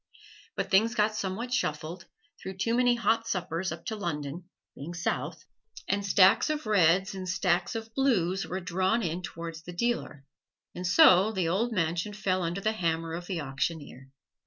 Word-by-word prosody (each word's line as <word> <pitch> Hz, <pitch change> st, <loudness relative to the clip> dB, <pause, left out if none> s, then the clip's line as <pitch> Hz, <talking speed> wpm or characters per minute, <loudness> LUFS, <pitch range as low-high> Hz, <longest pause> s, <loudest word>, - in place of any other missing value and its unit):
But -, -, -3 dB
things 220 Hz, +4 st, +4 dB
got 215 Hz, 0 st, +2 dB
somewhat 215 Hz, +5 st, -3 dB
shuffled, 170 Hz, -6 st, -2 dB, 0.4 s
through 190 Hz, 0 st, -7 dB
too 230 Hz, +5 st, 0 dB
many 245 Hz, 0 st, +3 dB
hot 225 Hz, 0 st, +1 dB
suppers 185 Hz, 0 st, -2 dB
up -, -, -8 dB
to 220 Hz, -, -3 dB
London 170 Hz, -4 st, -4 dB, 0.3 s
(being 165 Hz, +5 st, -7 dB
south), 170 Hz, -, -3 dB, 0.4 s
and 200 Hz, +1 st, 0 dB
stacks 195 Hz, +3 st, +5 dB
of 305 Hz, -3 st, -2 dB
reds 190 Hz, -2 st, +3 dB
and 185 Hz, -1 st, -5 dB
stacks 180 Hz, 0 st, 0 dB
of 225 Hz, 0 st, -6 dB
blues 195 Hz, -9 st, +1 dB
were 185 Hz, +2 st, -4 dB
drawn 190 Hz, +6 st, 0 dB
in 170 Hz, 0 st, -2 dB
towards 165 Hz, 0 st, -7 dB
the 175 Hz, +1 st, -9 dB
dealer, 175 Hz, -, -2 dB, 0.5 s
and 180 Hz, 0 st, -4 dB
so 195 Hz, -, +6 dB
the 185 Hz, -5 st, -1 dB
old 210 Hz, +8 st, 0 dB
mansion 175 Hz, 0 st, -1 dB
fell 190 Hz, -3 st, -1 dB
under 175 Hz, +3 st, -2 dB
the 215 Hz, -, +1 dB
hammer 165 Hz, -5 st, -2 dB
of 175 Hz, +1 st, -6 dB
the 180 Hz, -4 st, -3 dB
auctioneer. 135 Hz, -1 st, -4 dB
185 Hz, 170 wpm, -28 LUFS, 170-215 Hz, 0.5 s, so